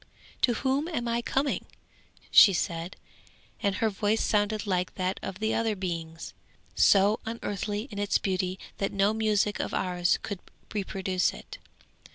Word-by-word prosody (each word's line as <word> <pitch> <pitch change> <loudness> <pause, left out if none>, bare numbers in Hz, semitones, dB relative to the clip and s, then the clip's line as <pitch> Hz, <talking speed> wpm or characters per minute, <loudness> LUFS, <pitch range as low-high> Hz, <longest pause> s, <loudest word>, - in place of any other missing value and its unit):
'To 240 - +3
whom 270 +5 0
am 245 -9 -2
I 235 0 0
coming?' 270 +4 -1 0.7
said 175 -2 +5
she, - - -30
and 200 -3 +1
her 220 +3 +1
voice 210 +2 +1
sounded 210 +1 +1
like 180 -2 -1
that 185 0 -1
of 190 - -5
the 220 +1 0
other 225 -2 +1
beings, 165 -3 -5 0.4
so 200 +2 +5
unearthly 210 -2 -3
in 200 - -5
its 205 0 +2
beauty 185 -1 -1 0.2
that 195 - 0
no 200 +2 +2
music 210 -1 +1
of - - -2
ours 180 -1 +1
could 200 -3 -4 0.3
reproduce 190 -2 0
it. - - -11
205 Hz, 150 wpm, -28 LUFS, 185-220 Hz, 0.7 s, said